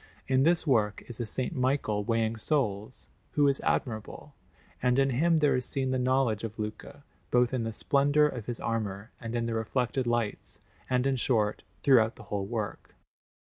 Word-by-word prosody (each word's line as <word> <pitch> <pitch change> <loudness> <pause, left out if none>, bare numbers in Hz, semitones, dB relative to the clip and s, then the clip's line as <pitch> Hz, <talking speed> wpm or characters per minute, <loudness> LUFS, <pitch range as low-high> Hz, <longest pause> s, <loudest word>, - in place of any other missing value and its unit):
In 130 0 +3
this 170 +4 +3
work 110 -8 +1
is 120 - -7
a 115 -3 -3 0.2
S. - - -4
Michael 130 -7 0
weighing 115 +1 0
souls, 110 -3 -2 0.2
who 145 -1 +4
is 140 -1 +2
admirable; 110 -4 -2 0.5
and 125 0 +2
in 135 0 +3
him 165 +6 +3
there 150 -2 +3
is 125 - 0
seen 130 +1 -1
the 130 - 0
knowledge 125 -4 +1
of 110 -1 -5
Luca, 110 +6 -6 0.3
both 125 0 +3
in 120 -3 -1
the 115 - -2
splendour 145 +6 +3
of 125 -7 -3
his 120 -1 -3
armour 110 -1 -3
and 115 0 -5
in 120 -1 0
the 115 - -2
reflected 120 +3 -1
lights, 120 -3 -2 0.3
and, 125 0 +1
in 135 -1 +1
short, 110 -4 +1 0.2
throughout 115 -5 +5
the - - -12
whole 100 -2 -3
work. 110 -3 -5
120 Hz, 180 wpm, -29 LUFS, 110-135 Hz, 0.5 s, throughout